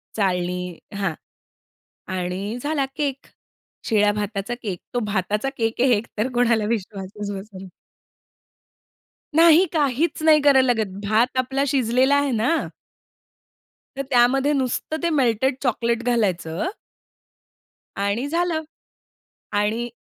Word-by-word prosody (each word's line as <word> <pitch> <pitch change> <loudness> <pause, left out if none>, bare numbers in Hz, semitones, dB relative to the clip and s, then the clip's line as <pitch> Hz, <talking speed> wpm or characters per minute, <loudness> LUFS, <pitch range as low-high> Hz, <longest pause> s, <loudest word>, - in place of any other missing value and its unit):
चाळणी 180 -3 -1 0.2
हां. 195 -4 -1 1.0
आणि 185 +5 -3
झाला 290 -2 0
केक. 275 -3 -2 0.6
शिळ्या 210 -2 +3
भाताचा 205 +1 -3
केक. 190 -5 -4
तो 245 - +1
भाताचा 210 +4 -1
केक 225 +1 -1
आहे 260 - +4
हे 240 - +5
एकतर 220 +1 -3
कोणाला 235 -3 +2
विश्वासच 205 -1 -4
बसाय 195 -1 -8 1.7
नाही, 335 +2 +7
काहीच 300 +1 +1
नाही 310 -1 +6
करायला 265 -3 +5
लागत. 220 -3 -1 0.2
भात 230 +5 +2
आपला 265 +2 0
शिजलेला 260 0 +2
आहे 285 -1 +2
ना 245 +8 +1 1.3
तर 275 - -2
त्यामध्ये 265 +3 +3
नुसतं 270 +3 -1
ते 340 - +2
मेल्टेड 265 -3 +2
चॉकलेट 235 -2 0
घालायचं 195 - 0 1.3
आणि 200 +7 -1
झालं. 335 0 0 0.9
आणि 215 +4 0
235 Hz, 110 wpm, -22 LUFS, 205-270 Hz, 1.7 s, नाही